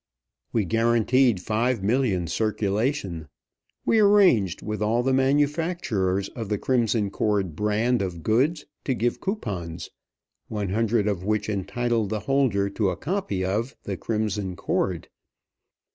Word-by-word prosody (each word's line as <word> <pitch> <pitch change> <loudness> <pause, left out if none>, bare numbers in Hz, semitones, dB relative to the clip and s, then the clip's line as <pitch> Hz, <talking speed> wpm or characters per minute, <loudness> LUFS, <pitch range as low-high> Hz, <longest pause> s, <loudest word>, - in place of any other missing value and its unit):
We 110 -3 +1
guaranteed 115 +1 +3
five 110 +2 0
million 105 -5 +1
circulation. 100 - -1 0.6
We 225 - +3
arranged 195 - +4
with 105 0 -4
all 115 +3 +1
the 135 +1 +1
manufacturers 135 - +1
of 115 -4 -6
the 105 - 0
Crimson 115 -4 +1
Cord 100 -6 0
brands 105 +5 +1
of 85 -3 -5
goods 145 +8 +1 0.2
to 130 - 0
give 120 +1 -1
coupons, 95 - -4 0.6
one 105 -3 -3
hundred 110 +1 +1
of 100 -4 -1
which 105 0 0
entitled 110 +2 -1
the 110 0 -2
holder 125 -6 +1
to 100 -1 0
a 90 - -3
copy 145 - -2
of 110 +8 -2
"The 100 - -3
Crimson 105 -3 -2
Cord." - - -1
110 Hz, 130 wpm, -25 LUFS, 100-125 Hz, 0.6 s, arranged